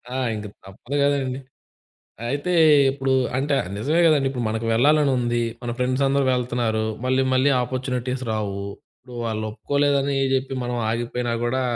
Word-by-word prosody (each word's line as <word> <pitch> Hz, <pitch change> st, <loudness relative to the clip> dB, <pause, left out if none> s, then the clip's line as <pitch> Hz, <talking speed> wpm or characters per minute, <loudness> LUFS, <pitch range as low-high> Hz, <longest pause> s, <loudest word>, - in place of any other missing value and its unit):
ఆ! -, -, -1 dB, 0.2 s
ఇంక 105 Hz, 0 st, -6 dB, 0.2 s
తప్పదు 95 Hz, +8 st, -7 dB
గదండి. 135 Hz, -2 st, 0 dB, 0.9 s
అయితే 145 Hz, +6 st, -2 dB, 0.4 s
ఇప్పుడు, 135 Hz, 0 st, -1 dB, 0.2 s
అంటే 140 Hz, +2 st, 0 dB, 0.2 s
నిజమే 150 Hz, +11 st, +1 dB
కదండి, 145 Hz, -4 st, +3 dB
ఇప్పుడు 125 Hz, -3 st, -3 dB
మనకు 110 Hz, +1 st, -2 dB
వెళ్లాలనుంది, 125 Hz, -2 st, +2 dB, 0.2 s
మన 120 Hz, -, -3 dB
ఫ్రెండ్స్ 130 Hz, +2 st, 0 dB
అందరూ 140 Hz, 0 st, +2 dB
వెళ్తున్నారు. 120 Hz, -3 st, -1 dB, 0.2 s
మళ్ళీ, 130 Hz, +1 st, +2 dB
మళ్ళీ 130 Hz, +2 st, +3 dB
ఆపర్చునిటీస్ 130 Hz, 0 st, -3 dB
రావు. 100 Hz, -2 st, -3 dB, 0.4 s
ఇప్పుడు 125 Hz, -1 st, -12 dB
వాళ్ళొప్పుకోలేదనీ 140 Hz, +6 st, 0 dB, 0.2 s
జెప్పి, 135 Hz, 0 st, -1 dB
మనం 120 Hz, 0 st, -3 dB
ఆగిపోయినా 120 Hz, +1 st, -2 dB
గూడా, 130 Hz, +2 st, 0 dB
130 Hz, 135 wpm, -23 LUFS, 120-140 Hz, 0.9 s, కదండి